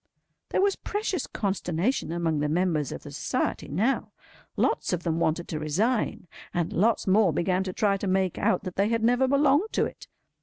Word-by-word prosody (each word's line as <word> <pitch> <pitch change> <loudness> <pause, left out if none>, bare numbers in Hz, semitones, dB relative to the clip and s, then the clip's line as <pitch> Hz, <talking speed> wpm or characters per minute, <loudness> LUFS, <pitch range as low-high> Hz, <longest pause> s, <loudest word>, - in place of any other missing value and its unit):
There - - +1
was 400 -1 +2
precious 410 -3 -2
consternation 190 +1 -1
among 165 -3 0
the 150 0 0
members 160 -3 0
of - - -7
the - - -9
Society, - - -2
now. 215 - 0 0.5
Lots - - +1
of 175 -1 -2
them 165 -1 0
wanted 170 +1 0
to 155 - -3
resign, 195 - 0 0.3
and 175 -2 -1
lots 220 +5 +2
more 195 -1 +4
began 180 +4 0
to 185 - -3
try 200 +1 +1
to 195 - -4
make 190 -1 +1
out 185 - +1
that 185 -2 -7
they 200 +2 +2
had 230 -1 0
never 245 +3 +3
belonged 285 +8 +3
to - - +2
it. - - -9
190 Hz, 190 wpm, -27 LUFS, 170-230 Hz, 0.5 s, more